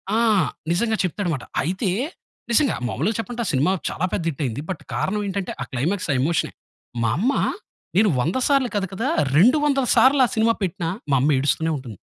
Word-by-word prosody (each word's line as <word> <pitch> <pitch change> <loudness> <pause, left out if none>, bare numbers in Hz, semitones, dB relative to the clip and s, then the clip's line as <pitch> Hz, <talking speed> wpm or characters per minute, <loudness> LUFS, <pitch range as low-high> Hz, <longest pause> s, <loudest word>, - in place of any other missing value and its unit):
ఆ! - - +3 0.6
నిజంగా 220 +4 +1
చెప్తాడుమాట. 175 - -2 0.2
అయితే 185 - -1 0.6
నిజంగా 265 +4 +3
మామూలుగా 165 - -1
చెప్పంటే 240 +1 -4
ఆ! - - -3
సినిమా 145 +7 +2 0.2
చాలా 180 - -1
పెద్ద 170 - -1
హిటయింది. 135 -2 -3
బట్ 180 - -6
కారణం 210 +2 -1
ఏంటంటే 195 -1 -3
ఆ! - - -2
క్లైమాక్స్ 165 +9 -1
ఆ - - 0
ఎమోషనే 160 +4 0 0.5
మా 110 - +2
అమ్మ 250 +8 +2 0.7
నేను 210 0 +5
100 165 - 0
సార్లు 275 -3 +2
కాదు 195 -2 0
కదా 230 +7 -2 0.3
200 240 - +6
వందల 275 -3 +2
సార్లు 270 +1 +5
ఆ - - 0
సినిమా 225 +1 +3
పెట్టిన 180 -1 -2 0.3
మా - - +5
అమ్మ 145 - +2
ఏడుస్తూనే 160 +4 +1
ఉంటుంది. 120 -8 -9
190 Hz, 180 wpm, -22 LUFS, 150-230 Hz, 0.7 s, 200